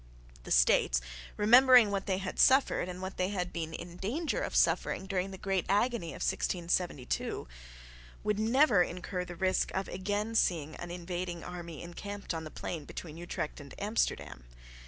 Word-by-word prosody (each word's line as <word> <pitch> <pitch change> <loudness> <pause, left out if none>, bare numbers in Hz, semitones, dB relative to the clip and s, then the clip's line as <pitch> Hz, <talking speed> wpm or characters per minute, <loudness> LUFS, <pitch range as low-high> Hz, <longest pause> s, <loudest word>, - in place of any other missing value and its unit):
The - - -8
States, - - +4 0.4
remembering 245 0 +7
what 195 0 -2
they 190 -2 +1
had 190 -1 -5
suffered 265 -8 +4
and 180 +1 -6
what 190 +1 -5
they 185 +1 0
had 180 -3 -3
been 165 -2 -3
in 175 +2 -8
danger 290 - -2
of - - -3
suffering - - +2
during 190 -1 -1
the 190 - -8
great 190 -2 -1
agony 210 -1 +1
of 155 - -5
1672, 170 - -1 0.8
would 210 -1 0
never 230 -2 +4
incur 180 +1 -2
the 175 -1 -8
risk 185 +2 +1
of 190 +1 -1
again 205 +4 -2
seeing 160 -8 +1
an 175 - -7
invading 175 0 -4
army 170 -3 -7
encamped 200 +3 -6
on 160 -1 -4
the - - -6
plain 155 -1 -5
between 155 0 -8
Utrecht 170 -2 -5
and 140 -2 -11
Amsterdam. 200 - -1
185 Hz, 165 wpm, -31 LUFS, 170-205 Hz, 0.8 s, remembering